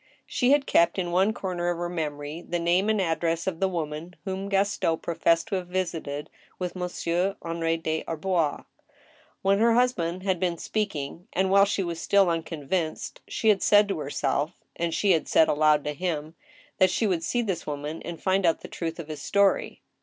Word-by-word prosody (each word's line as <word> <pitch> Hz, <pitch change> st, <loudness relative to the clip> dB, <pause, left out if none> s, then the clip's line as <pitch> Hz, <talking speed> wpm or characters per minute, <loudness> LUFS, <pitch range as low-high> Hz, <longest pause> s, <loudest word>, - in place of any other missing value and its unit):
She 250 Hz, -, +1 dB
had 285 Hz, 0 st, +4 dB
kept 170 Hz, -5 st, +3 dB
in 175 Hz, -2 st, -1 dB
one 190 Hz, +4 st, +3 dB
comer 180 Hz, -5 st, -2 dB
of 175 Hz, -, -1 dB
her 175 Hz, 0 st, -2 dB
memory 150 Hz, -2 st, -4 dB
the 175 Hz, -, -3 dB
nan)e 175 Hz, +4 st, +2 dB
and 215 Hz, -1 st, +2 dB
address 165 Hz, -1 st, 0 dB
of 180 Hz, -4 st, -2 dB
the 195 Hz, -, +2 dB
woman 165 Hz, -1 st, -4 dB
whom 195 Hz, +1 st, -3 dB
Gaston 195 Hz, -4 st, +1 dB
professed 165 Hz, +3 st, +1 dB
to 195 Hz, -, 0 dB
have 180 Hz, -1 st, -5 dB
visited 170 Hz, -5 st, -3 dB, 0.3 s
with 180 Hz, 0 st, -4 dB
Monsieur 180 Hz, +1 st, -1 dB
Henri 165 Hz, 0 st, -1 dB
des 160 Hz, -1 st, -2 dB
Arbois. 165 Hz, -2 st, -1 dB, 0.8 s
When 195 Hz, +1 st, +3 dB
her 230 Hz, +1 st, +4 dB
husband 185 Hz, -8 st, +1 dB
had 190 Hz, -3 st, 0 dB
been 175 Hz, -2 st, 0 dB
speaking, 170 Hz, -6 st, -3 dB
and 190 Hz, +1 st, +1 dB
while 200 Hz, 0 st, +7 dB
she 200 Hz, -1 st, -1 dB
was 170 Hz, -2 st, -4 dB
still 195 Hz, -3 st, +4 dB
unconvinced, 165 Hz, 0 st, -3 dB
she 220 Hz, -, +1 dB
had 205 Hz, -3 st, +4 dB
said 205 Hz, 0 st, +5 dB
to 190 Hz, -5 st, -2 dB
herself 145 Hz, +1 st, -2 dB
(and 170 Hz, 0 st, -1 dB
she 200 Hz, +4 st, +2 dB
had 165 Hz, -3 st, +2 dB
said 160 Hz, -, +5 dB
aloud 150 Hz, 0 st, +3 dB
to 150 Hz, -, -2 dB
him) 160 Hz, -2 st, -3 dB, 0.5 s
that 185 Hz, -1 st, +6 dB
she 220 Hz, -, 0 dB
would 180 Hz, -5 st, 0 dB
see 240 Hz, +7 st, 0 dB
this 190 Hz, -8 st, -3 dB
woman 150 Hz, +2 st, -4 dB
and 170 Hz, -1 st, -7 dB
find 190 Hz, +1 st, +1 dB
out 165 Hz, -2 st, +2 dB
the -, -, -8 dB
truth 165 Hz, -1 st, -4 dB
of 170 Hz, -3 st, -7 dB
his 155 Hz, -1 st, -6 dB
story. 200 Hz, -1 st, +1 dB
175 Hz, 195 wpm, -26 LUFS, 165-195 Hz, 0.8 s, while